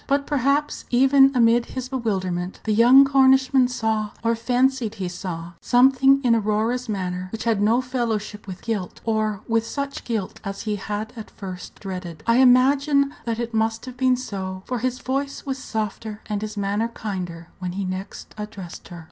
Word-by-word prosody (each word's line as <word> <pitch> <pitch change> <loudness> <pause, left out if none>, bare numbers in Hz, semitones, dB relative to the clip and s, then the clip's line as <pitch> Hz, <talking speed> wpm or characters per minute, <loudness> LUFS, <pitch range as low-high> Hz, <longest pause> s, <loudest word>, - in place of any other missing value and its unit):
But 280 0 +1
perhaps, 285 +1 0
even 270 +2 +5
amid 235 0 +4
his 255 -1 -3
bewilderment, 190 -8 -2
the 215 - 0
young 245 +5 +7
Cornishman 265 -1 +4
saw, 220 -3 -1
or 230 0 +2
fancied 245 -1 +1
he 190 -4 -3
saw, 175 -2 -6
something 270 +2 +4
in 240 -2 +4
Aurora's 225 +3 0
manner 185 -2 -3
which 225 - -5
had 225 -3 +1
no 225 +4 +3
fellowship 225 -5 -3
with 185 -1 -8
guilt, 210 -6 -3
or 215 -2 0
with 230 -1 +2
such 280 +4 -4
guilt 220 -5 -3
as 195 0 -5
he 210 -2 -2
had 210 +3 -4
at 220 -2 -8
first 185 -2 -9
dreaded. 180 -5 -7
I 230 +1 +3
imagine 275 +3 +4
that 230 -1 -1
it 235 0 -4
must 225 +1 0
have 255 -1 -8
been 255 -1 +3
so, 190 -6 -5
for 250 -1 -2
his 255 +1 -1
voice 275 +2 -3
was 270 -1 -3
softer 220 -2 -4
and 210 -1 -3
his 215 0 -5
manner 205 +3 0
kinder 180 -7 -6
when 180 -1 -4
he 195 +1 -3
next 185 +1 -6
addressed 205 -5 -8
her. 175 - -9
225 Hz, 175 wpm, -23 LUFS, 200-255 Hz, -, young